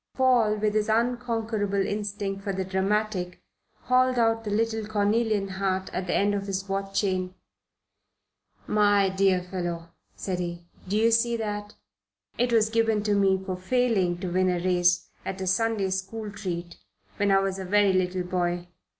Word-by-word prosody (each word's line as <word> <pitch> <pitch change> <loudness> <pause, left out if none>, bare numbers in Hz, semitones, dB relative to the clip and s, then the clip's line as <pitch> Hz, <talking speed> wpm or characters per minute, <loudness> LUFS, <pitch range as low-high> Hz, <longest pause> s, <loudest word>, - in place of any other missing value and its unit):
Paul, 245 -5 +3
with 210 0 0
his 215 0 0
unconquerable 225 -4 0
instinct 205 -1 -3
for 200 0 -3
the 190 0 -2
dramatic, 190 -1 -1 0.4
hauled 255 0 +2
out 225 -1 +2
the 210 - -4
little 220 +1 0
cornelian 210 0 +1
heart 190 0 -2
at 185 - -3
the - - 0
end 205 +1 +2
of 200 0 -3
his 195 0 -3
watch 195 0 -2
chain. 185 -2 -1 1.3
"My 205 -2 +3
dear 190 -1 +2
fellow," 175 -2 -4 0.3
said 185 -2 -3
he. 175 -1 -5 0.2
"Do 200 +3 0
you 225 +1 +4
see 235 +1 +2
that? 210 -1 -4 0.6
It 245 0 +2
was 220 -1 +3
given 225 -2 +2
to 210 -1 +1
me 195 -1 +2
for 185 -1 -2
failing 190 -3 +1
to 185 -3 -3
win 185 +1 +2
a 180 - +1
race 175 0 +2 0.2
at 190 - -5
a 190 - -3
Sunday 200 0 +1
school 205 +3 -4
treat, 175 -4 -5 0.4
when 205 0 +1
I 195 - +5
was 195 0 -1
a - - -4
very 200 +1 +3
little 185 0 0
boy. 175 -1 -2
200 Hz, 165 wpm, -26 LUFS, 185-220 Hz, 1.3 s, I